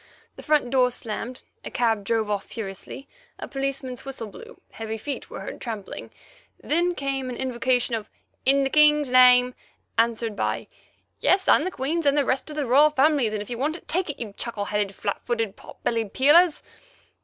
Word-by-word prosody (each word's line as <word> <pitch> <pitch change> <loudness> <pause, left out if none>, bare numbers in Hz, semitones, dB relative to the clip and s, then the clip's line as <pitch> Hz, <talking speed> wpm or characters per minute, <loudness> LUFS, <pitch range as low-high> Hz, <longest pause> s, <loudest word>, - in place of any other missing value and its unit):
The - - -10
front 300 -5 +1
door 255 -2 +4
slammed, 240 +1 -6 0.2
a - - -5
cab 225 -4 0
drove 225 0 0
off 205 -1 -2
furiously, 220 +5 -7 0.3
a - - -7
policeman's 270 -2 -4
whistle 270 -4 -6
blew, 460 - -13
heavy 225 0 -5
feet 280 +6 -6
were - - -7
heard - - -8
trampling; 220 -5 -6 0.5
then 345 +3 0
came 270 -3 -3
an 250 - -5
invocation 250 -1 0
of 220 -2 -3 0.3
"In 275 +1 +4
the 270 - -1
King's 300 -2 +5
name," 250 0 +6 0.5
answered 230 -1 +1
by - - -2 0.5
"Yes, 380 0 +2
and 320 - +5
the - - 0
Queen's, 310 0 -2
and 280 +1 +3
the 285 - +3
rest 265 +4 -1
of 300 - -7
the 295 -2 -1
Royal 280 +5 +5
Family's, 285 -5 +2
and 210 -1 -2
if - - -14
you 240 - -4
want 305 +5 -1
it, - - -19
take 365 0 -1
it, 290 - -4
you 215 -4 -5
chuckle 215 -4 -3
headed, 205 -1 -2
flat 200 - -3
footed, 225 -4 -2
pot - - -15
bellied 225 -3 -1
Peelers." 305 +5 +5
255 Hz, 190 wpm, -24 LUFS, 225-290 Hz, 0.5 s, name